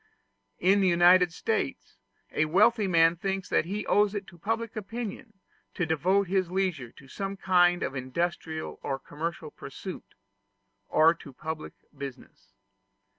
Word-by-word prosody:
In 195 +3 +3
the 190 - +3
United 175 0 +6
States 450 - -3 0.3
a 155 - +1
wealthy 205 +6 +3
man 165 -2 +4
thinks 195 +1 -3
that - - +2
he 200 +4 -3
owes 205 0 +3
it 200 -1 -3
to 175 - -17
public 225 +4 -2
opinion 220 +1 -6 0.4
to 180 - 0
devote 180 +6 +2
his 185 -1 0
leisure 180 -10 -1
to 140 - -16
some 195 +7 -5
kind 175 -2 +3
of 135 - -3
industrial 160 +4 -3
or 135 - -2
commercial 155 +2 -5
pursuit, 185 +6 -9 0.7
or 160 +1 +5
to 145 - -12
public 155 +3 -6 0.2
business. 130 -8 -10
175 Hz, 140 wpm, -28 LUFS, 155-195 Hz, 0.7 s, United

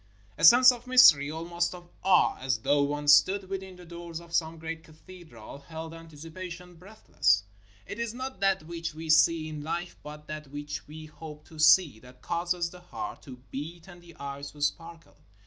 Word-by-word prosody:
A - - -7
sense 250 +9 +9
of 245 0 -9
mystery, 165 - +7
almost 170 +2 -3
of 175 -1 -13 0.2
awe, 190 -1 +4
as 130 -2 -1
though 140 +5 +1
one 145 +1 -2
stood 190 +6 +5
within 190 -1 -6
the 180 0 -14
doors 170 -1 -8
of 170 0 -15
some 165 -1 0
great 160 0 -7
cathedral, 155 - -13
held 160 +2 -9
antici 165 -1 -12
pation 180 0 -9
breathless. 170 - 0 0.4
It 210 - -8
is 235 -1 -2
not 260 +3 -7
that 195 -3 +1
which 165 0 -6
we 160 0 -2
see 160 0 +4
in 155 -1 -7
life, 170 +3 -4
but 150 0 -10
that 155 -1 -7
which 145 +1 -7
we 155 +1 -10
hope 150 -1 -11
to 160 -2 -13
see, 155 -6 +5
that 125 +2 -17
causes 170 0 -2
the 180 - -13
heart 355 - -7
to 125 -3 -12
beat 160 +5 -7
and 175 -2 -13
the 170 -2 -16
eyes 140 0 -6
to 145 - -14
sparkle. 165 +2 -4
165 Hz, 190 wpm, -28 LUFS, 150-180 Hz, 0.4 s, sense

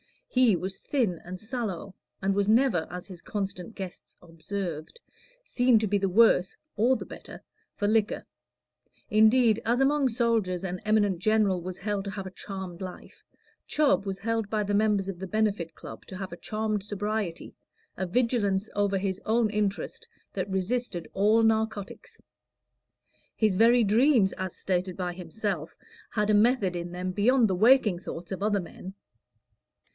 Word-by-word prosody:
He 250 -6 +4
was 190 +2 -4
thin 225 - -1
and 180 +1 -7
sallow, 215 -5 -4 0.3
and 195 0 +2
was 200 0 +1
never, 225 -8 +3
as 180 +1 -7
his 185 -3 -11
constant 195 0 -5
guests 190 -3 -8
observed, 170 - -6 0.4
seen 245 - +3
to 215 - +1
be 205 +1 +2
the 195 0 0
worse 190 -2 +4 0.2
(or 240 +5 +3
the - - -5
better) - - -11 0.3
for 205 - -1
liquor; 215 0 +1 0.9
indeed, 220 +1 +5
as 240 +2 +1
among 275 +1 +3
soldiers 225 -7 0
an 180 -1 -3
eminent 205 -4 +2
general 205 -2 +2
was 185 +1 -6
held 205 -1 -3
to 200 - -4
have 195 -1 -6
a 190 - -7
charmed 190 -2 -7
life, 185 -1 -9 0.5
Chubb 285 -8 +2
was 195 -1 -4
held 225 -1 -1
by 215 -1 0
the 205 0 -2
members 205 -2 +2
of 180 -3 -6
the 190 - -5
Benefit 200 -5 -1
Club - - -10
to 185 - -8
have 190 -1 -6
a 170 - -7
charmed 215 -1 -2
sobriety, 205 -3 -3 0.4
a 190 - -2
vigilance 215 -2 +1
over 200 -1 +1
his 190 -1 -2
own 220 -1 +2
interest 210 -2 -2 0.3
that 190 0 -3
resisted 190 -1 -2
all 215 +3 +4
narcotics. 220 -2 -1 1.2
His 215 -4 +2
very 235 +2 +5
dreams, 225 0 +4
as 185 -1 -5
stated 185 -1 -2
by 180 -2 -2
himself, 180 -1 -4 0.3
had 210 -1 0
a - - +4
method 210 -3 +3
in 175 0 -4
them 180 +1 -3
beyond 230 +5 +3
the - - +1
waking 220 -2 +4
thoughts 175 0 -8
of 190 - -4
other 205 -1 +1
men. 185 +2 -10
205 Hz, 160 wpm, -27 LUFS, 185-220 Hz, 1.2 s, indeed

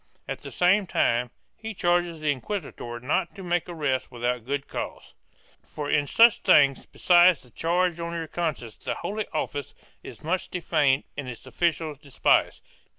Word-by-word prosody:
At - - -4
the - - -9
same 185 +2 +3
time 120 -5 +1 0.3
he 225 -1 -7
charges 175 -2 +1
the 150 -1 +2
inquisitor 130 - -5
not 145 +7 -1
to 195 - -9
make 175 0 -1
arrests 145 -6 -1
without 120 -1 -2
good 140 0 -2
cause, - - -6 0.6
"for 145 -1 -3
in 145 -1 +2
such 230 - +6
things, 140 -8 +4
besides 175 -3 +5
the 125 - -21
charge 175 +3 0
on 170 0 -4
your 165 -1 -3
conscience, 155 -9 -3
the - - -4
Holy 210 +1 -4
Office 145 -2 -4 0.3
is - - -11
much 175 +4 -1
defamed 155 -6 +1
and 140 -3 -5
its 120 0 -9
officials 155 +1 -1
despised." 140 -3 +1
160 Hz, 160 wpm, -26 LUFS, 135-175 Hz, 0.6 s, such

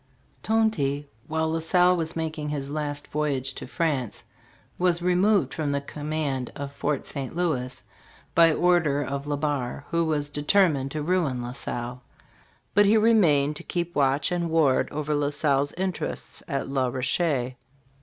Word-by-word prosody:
Tonty, 155 -11 +1 0.2
while 160 0 0
La 165 - 0
Salle 180 +2 +4
was 165 -1 -2
making 155 -2 -3
his 140 -2 -4
last 145 -1 -3
voyage 140 -3 -1
to - - -8
France, 140 -6 -2 0.6
was 175 -1 +2
removed 180 +3 +2
from 155 -3 -1
the 140 - +1
command 145 -3 -3
of 140 0 -5
Fort 145 0 -2
St 140 0 -6
Louis 140 -8 -1 0.5
by 165 -1 +6
order 160 -4 +2
of 140 +1 -4
Le 145 -1 -1
Barre, 140 -2 -2
who 170 +1 +2
was 150 -2 -1
deter 150 +7 +4
mined 135 -3 -2
to 150 +1 -4
ruin 160 -7 +1
La 120 - -5
Salle; 125 -1 -5 0.7
but 205 0 +5
he 215 +2 +5
remained 165 -11 +4
to - - -9
keep 175 -1 -3
watch 140 +2 +2
and 175 -1 -1
ward 155 -5 +3
over 150 0 -2
La 145 -1 +1
Salle's 145 -1 +1
interests 185 +1 -3
at 140 -4 -2
La 135 -1 0
Rocher. 130 +1 0
150 Hz, 160 wpm, -26 LUFS, 140-170 Hz, 0.7 s, by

